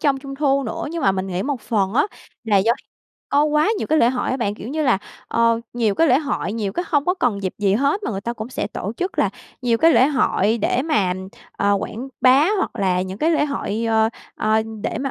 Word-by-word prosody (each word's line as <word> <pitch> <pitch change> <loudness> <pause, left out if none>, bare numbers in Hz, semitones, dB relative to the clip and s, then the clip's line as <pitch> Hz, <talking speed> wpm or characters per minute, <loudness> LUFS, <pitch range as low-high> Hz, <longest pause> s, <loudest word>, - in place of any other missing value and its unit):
trông 280 -3 +2
Trung 275 0 -8
thu 275 -1 +1
nữa. 225 - -4
Nhưng 335 0 -4
mà 195 - +4
mình 190 0 -2
nghĩ 185 0 -2
một 275 -3 -2
phần 200 -3 -1
á, 280 - +3 0.4
là 215 -3 +2
do 210 +4 +4 0.6
có 290 +1 +3
quá 300 +3 +2
nhiều - - -3
cái 310 0 +2
lễ 235 - +4
hội 250 -1 -2
á 260 - 0
bạn. 205 -5 -1
Kiểu 215 - -8
như 310 +3 -1
là, 250 -9 +3 0.3
ờ, 230 0 +2
nhiều 225 -4 +1
cái 330 - +3
lễ 255 - +5
hội, 280 - -2
nhiều 210 -3 -2
cái 350 - -2
hông 290 -3 +2
có 360 - +2
cần 235 - -1
dịp 185 - -2
gì 200 -1 +2
hết 280 - +1
mà - - -2
người 195 -3 -3
ta 235 +4 -3
cũng 220 0 -7
sẽ 255 - -3
tổ 205 0 -5
chức 365 +2 -3
là - - +3 0.3
nhiều 235 -2 +2
cái 330 +5 +5
lễ 260 - +5
hội 235 -6 +1
để 245 +4 +1
mà, 240 - +1 0.4
ờ, 200 0 +1
quảng 245 +7 -6
bá 270 +6 +5
hoặc - - 0
là 185 -2 +1
những 190 +1 -6
cái 315 +6 +2
lễ 310 -3 +2
hội, 230 -6 -3
ờ, 220 0 +3 0.3
ờ, 220 0 +2 0.2
để - - -2
mà 270 0 -2
235 Hz, 255 wpm, -21 LUFS, 205-285 Hz, 0.6 s, lễ